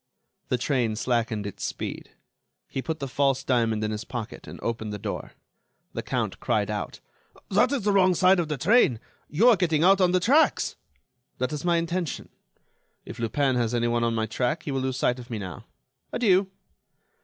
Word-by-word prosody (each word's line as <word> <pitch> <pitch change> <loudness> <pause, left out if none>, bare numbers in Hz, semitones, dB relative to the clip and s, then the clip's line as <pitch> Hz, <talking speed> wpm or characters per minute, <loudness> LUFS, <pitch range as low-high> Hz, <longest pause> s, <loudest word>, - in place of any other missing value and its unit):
The 125 - +1
train 120 -3 0
slackened 115 -2 -1
its 100 - -6
speed. - - -5 0.6
He 135 - -4
put 160 +3 -3
the 140 - -4
false 135 0 +1
diamond 115 -4 +1
in 110 - -1
his 105 0 -4
pocket 115 -2 -7
and - - -9
opened 110 -2 -3
the 105 - -4
door. - - -5 0.6
The - - -3
Count - - -2
cried - - 0
out: - - -4 0.5
"That 210 +7 +4
is 275 -6 -1
the 205 - +2
wrong 185 -2 +4
side 185 +1 +5
of 170 - 0
the 150 -1 -2
train. 155 - +4 0.3
You 190 +11 +3
are 235 - +7
getting 165 -5 +1
out 195 +2 +5
on 180 -1 +4
the 185 - +3
tracks." 275 - +3 0.6
"That 125 +3 -2
is 150 - -4
my 175 -1 +2
intention. 170 -1 -3 0.8
If 120 - -9
Lupin 130 +4 +1
has 120 0 0
anyone 120 0 +1
on 115 -1 +1
my 110 -1 0
track, 125 +7 -1
he 145 - -4
will 135 -1 -1
lose 130 -1 -2
sight 125 0 +1
of 120 - -11
me 115 - -3
now. 95 -5 -7 0.5
Adieu." 195 -5 +3
135 Hz, 190 wpm, -26 LUFS, 115-180 Hz, 0.8 s, are